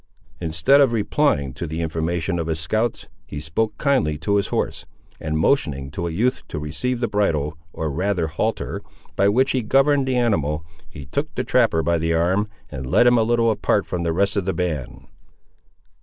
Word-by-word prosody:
Instead 80 Hz, -, +3 dB
of 130 Hz, -4 st, +4 dB
replying 105 Hz, -, +1 dB
to 85 Hz, +5 st, -5 dB
the 80 Hz, +2 st, -4 dB
information 85 Hz, +2 st, -1 dB
of 80 Hz, -, -2 dB
his 80 Hz, -1 st, -1 dB
scouts, 110 Hz, +8 st, -1 dB, 0.2 s
he 75 Hz, -, -6 dB
spoke 80 Hz, +9 st, -2 dB
kindly 130 Hz, -, +1 dB
to 100 Hz, +7 st, 0 dB
his 100 Hz, -, 0 dB
horse, -, -, -2 dB, 0.4 s
and 80 Hz, 0 st, -2 dB
motioning 70 Hz, -, +1 dB
to 85 Hz, +3 st, -3 dB
a -, -, -2 dB
youth 115 Hz, +10 st, 0 dB
to -, -, -6 dB
receive 100 Hz, +12 st, -2 dB
the 120 Hz, -, 0 dB
bridle, 80 Hz, -8 st, 0 dB, 0.2 s
or 80 Hz, -1 st, -3 dB
rather 90 Hz, +2 st, 0 dB
halter, 80 Hz, +8 st, -2 dB, 0.3 s
by 100 Hz, -, +3 dB
which 130 Hz, +6 st, +3 dB
he 130 Hz, -, +1 dB
governed 135 Hz, +4 st, +3 dB
the 130 Hz, -1 st, +1 dB
animal, 80 Hz, -10 st, 0 dB, 0.2 s
he 70 Hz, -, -10 dB
took -, -, -3 dB
the -, -, -1 dB
trapper 80 Hz, 0 st, +2 dB
by 85 Hz, 0 st, +1 dB
the 80 Hz, +1 st, +1 dB
arm, 95 Hz, +6 st, +1 dB, 0.2 s
and 65 Hz, 0 st, -6 dB
led 120 Hz, -, +5 dB
him 120 Hz, -1 st, +5 dB
a -, -, +4 dB
little 115 Hz, 0 st, +2 dB
apart 105 Hz, -1 st, +1 dB
from 90 Hz, -, -3 dB
the 85 Hz, -1 st, 0 dB
rest 100 Hz, +5 st, +1 dB
of 100 Hz, -3 st, 0 dB
the 95 Hz, -, -1 dB
band. 80 Hz, -8 st, -3 dB
85 Hz, 195 wpm, -22 LUFS, 80-115 Hz, 0.4 s, led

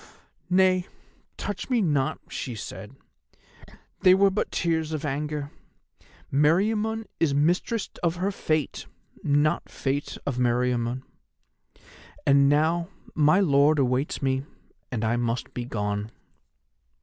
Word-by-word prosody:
"'Nay, 185 Hz, 0 st, +3 dB, 0.5 s
touch 205 Hz, +3 st, -5 dB
me 250 Hz, -2 st, +2 dB
not,' 145 Hz, -9 st, +1 dB
she 125 Hz, -, -5 dB
said. 105 Hz, +3 st, -8 dB, 1.0 s
'They 185 Hz, 0 st, +6 dB
were 195 Hz, 0 st, +4 dB
but 200 Hz, -, -1 dB
tears 160 Hz, -2 st, 0 dB
of 155 Hz, 0 st, -3 dB
anger. 145 Hz, +1 st, -3 dB, 0.8 s
Meriamun 210 Hz, +9 st, +2 dB
is 150 Hz, -4 st, +2 dB
mistress 175 Hz, +9 st, +1 dB
of 170 Hz, -1 st, +1 dB
her 185 Hz, +3 st, -1 dB
Fate, 155 Hz, -6 st, -2 dB, 0.4 s
not 145 Hz, +1 st, +1 dB
Fate 140 Hz, +1 st, -3 dB
of 135 Hz, -3 st, -2 dB
Meriamun. 125 Hz, 0 st, 0 dB, 1.2 s
And 140 Hz, 0 st, +5 dB
now, 160 Hz, +4 st, +2 dB, 0.2 s
my 155 Hz, +5 st, +4 dB
lord 150 Hz, -3 st, +4 dB
awaits 130 Hz, +2 st, 0 dB
me, 135 Hz, 0 st, +1 dB, 0.5 s
and 115 Hz, -3 st, -1 dB
I 115 Hz, +2 st, +1 dB
must 120 Hz, 0 st, -2 dB
be 120 Hz, -, -4 dB
gone. 105 Hz, -3 st, -2 dB
150 Hz, 115 wpm, -26 LUFS, 130-175 Hz, 1.2 s, They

